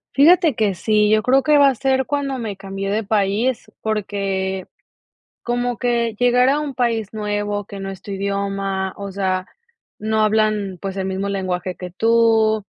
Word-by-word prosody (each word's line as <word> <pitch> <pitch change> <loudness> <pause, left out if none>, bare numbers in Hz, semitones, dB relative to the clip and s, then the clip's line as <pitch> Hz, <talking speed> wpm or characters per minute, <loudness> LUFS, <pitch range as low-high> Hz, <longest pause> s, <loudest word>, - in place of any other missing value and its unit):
Fíjate 315 +1 +5
que 210 -3 +1
sí, 210 +3 +2
yo 215 0 +4
creo 260 +4 +3
que 300 -1 +4
va 280 -1 +7
a 265 - -1
ser 265 +1 0
cuando 280 -2 -2
me 215 -4 -5
cambié 195 0 -5
de 215 +2 0
país, 215 +4 0
porque, 195 -3 -2 0.8
como 245 0 -1
que 235 -2 0
llegar 245 +1 +4
a 285 +2 +2
un 290 -3 -4
país 230 -4 -1
nuevo, 205 -1 -2
que 200 0 -9
no 195 0 -5
es 190 -1 -9
tu 205 - -7
idioma, 195 -1 -2
o 200 -1 -6
sea, 185 -1 -1 0.5
no 220 0 0
hablan, 215 -3 +1
pues, 195 +1 -5
el 190 - -2
mismo 190 +1 -2
lenguaje 185 -2 -2
que 180 +1 -7
tú. 220 +1 +3
210 Hz, 175 wpm, -20 LUFS, 195-240 Hz, 0.8 s, va